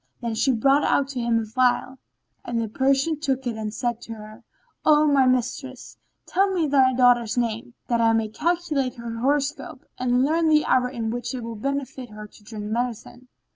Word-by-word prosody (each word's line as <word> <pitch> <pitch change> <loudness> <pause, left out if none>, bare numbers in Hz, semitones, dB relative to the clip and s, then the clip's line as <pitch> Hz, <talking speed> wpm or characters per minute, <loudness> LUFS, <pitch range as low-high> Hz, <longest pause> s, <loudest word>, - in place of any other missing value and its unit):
Then 235 -2 -3
she 245 +5 +2
brought 270 +5 +3
out 275 -1 +1
to 270 -3 -4
him 235 -1 +1
a 225 - -3
phial—and 245 0 -2
the 225 - -1
Persian 275 +6 +1
looked 265 -1 0
at 240 - -1
it 220 - -8
and 215 -1 -3
said 240 0 -3
to 230 - -8
her, 215 +2 -12 0.4
"O 305 0 +5
my 280 -3 +4
mistress, 255 +1 -2 0.3
tell 390 +2 +1
me 350 -4 +1
thy 270 -3 +4
daughter's 245 -2 +3
name, 235 0 -2
that 235 -1 +1
I 225 0 +4
may 225 -1 +1
calculate 305 -1 -1
her 235 -1 -6
horoscope 290 +3 -1
and 250 +1 +2
learn 320 +2 +2
the 305 -1 +4
hour 250 -1 +2
in 230 -4 -3
which 245 +2 -4
it 245 - -5
will 230 0 -5
befit 265 +1 -4
her 210 0 -9
to 210 0 -18
drink 210 -1 -7
medicine." 240 +2 -4
250 Hz, 195 wpm, -24 LUFS, 230-275 Hz, 0.4 s, O